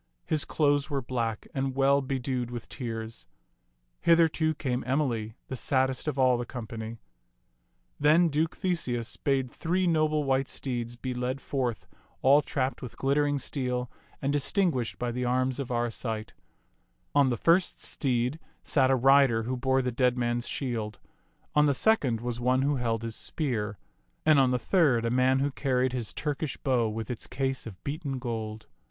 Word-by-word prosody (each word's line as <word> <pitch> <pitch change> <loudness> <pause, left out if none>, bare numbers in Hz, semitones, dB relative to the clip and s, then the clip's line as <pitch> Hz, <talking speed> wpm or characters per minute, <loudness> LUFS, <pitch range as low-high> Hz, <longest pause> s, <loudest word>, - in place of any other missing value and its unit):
His 155 -2 0
clothes 145 -1 +1
were 140 -3 -1
black 115 -3 -2
and 135 -1 -2
well 140 +1 +4
bedewed 130 -2 -2
with 120 -2 -6
tears. 115 -3 -6 0.7
Hither, 165 -1 +6
too, 155 0 0
came 130 -4 -2
Emily, 120 -6 0
the 130 - -4
saddest 130 +2 +1
of 145 -2 -1
all 130 -2 +4
the - - -1
company. 115 -2 -6 1.0
Then 155 +4 +5
Duke 160 +3 0
Theseus 130 - -1
bade 135 -3 0
three 180 +3 0
noble 155 -3 +2
white 135 -1 +1
steeds 120 -3 -4
be 125 +1 -4
led 125 +2 -2
forth 125 -5 -2 0.4
all 140 +3 +6
trapped 135 -2 -2
with 125 - -8
glittering 145 +1 +2
steel 125 -3 -3 0.3
and 140 +1 +1
distinguished 145 - 0
by 120 -1 -2
the 125 +1 -2
arms 130 +2 +1
of 135 - -3
Arcite. 115 -2 -2 0.8
On 140 -2 +4
the 120 - 0
first 170 - +3
steed 125 +1 0 0.2
sat 130 -3 +3
a 135 - +4
rider 135 -3 +5
who 125 +3 -2
bore 130 +1 +1
the 125 - -1
dead 125 +1 +2
man's 120 0 -1
shield; 115 -6 -3 0.5
on 150 0 +5
the 140 - +2
second 135 - +2
was 120 -1 -3
one 130 +2 +2
who 145 0 +1
held 115 -2 -1
his 115 -1 -3
spear; 110 - -2 0.5
and 155 -2 +6
on 130 -1 +4
the 125 - +2
third 125 -4 +2
a 115 - 0
man 130 +1 +3
who 140 +1 +1
carried 130 -2 0
his 120 -4 -3
Turkish 150 -1 -3
bow 125 -5 +1
with 110 +2 -4
its 120 - -5
case 135 -3 -2
of 95 -5 -11
beaten 140 -2 -3
gold. 110 -3 -4
130 Hz, 170 wpm, -28 LUFS, 120-140 Hz, 1.0 s, Hither